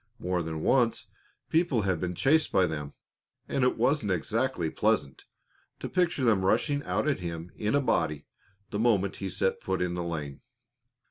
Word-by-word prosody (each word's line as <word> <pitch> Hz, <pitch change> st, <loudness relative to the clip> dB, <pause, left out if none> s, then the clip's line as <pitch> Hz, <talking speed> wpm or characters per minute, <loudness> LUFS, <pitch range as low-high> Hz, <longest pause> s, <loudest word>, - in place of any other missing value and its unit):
More 90 Hz, -1 st, -1 dB
than 80 Hz, -1 st, -4 dB
once 120 Hz, -4 st, +2 dB, 0.5 s
people 160 Hz, -, +2 dB
had 95 Hz, -4 st, 0 dB
been 90 Hz, -1 st, -2 dB
chased 155 Hz, -, +3 dB
by 95 Hz, -, +4 dB
them, 75 Hz, -4 st, -4 dB, 0.5 s
and 135 Hz, -, 0 dB
it 125 Hz, -, +2 dB
wasn't 135 Hz, -8 st, +1 dB
exactly 80 Hz, 0 st, -1 dB
pleasant 105 Hz, -11 st, 0 dB, 0.5 s
to -, -, -4 dB
picture 175 Hz, -6 st, 0 dB
them 110 Hz, -6 st, +3 dB
rushing 140 Hz, +9 st, +2 dB
out -, -, 0 dB
at 140 Hz, -, +1 dB
him 85 Hz, 0 st, -6 dB
in 105 Hz, +5 st, 0 dB
a 145 Hz, -, +3 dB
body 80 Hz, -, 0 dB, 0.5 s
the 105 Hz, -, -2 dB
moment 105 Hz, -4 st, +2 dB
he 95 Hz, -, -4 dB
set 95 Hz, +1 st, -1 dB
foot 95 Hz, 0 st, -2 dB
in 90 Hz, -1 st, -1 dB
the 90 Hz, 0 st, -3 dB
lane. 75 Hz, -5 st, -5 dB
95 Hz, 175 wpm, -28 LUFS, 85-125 Hz, 0.5 s, by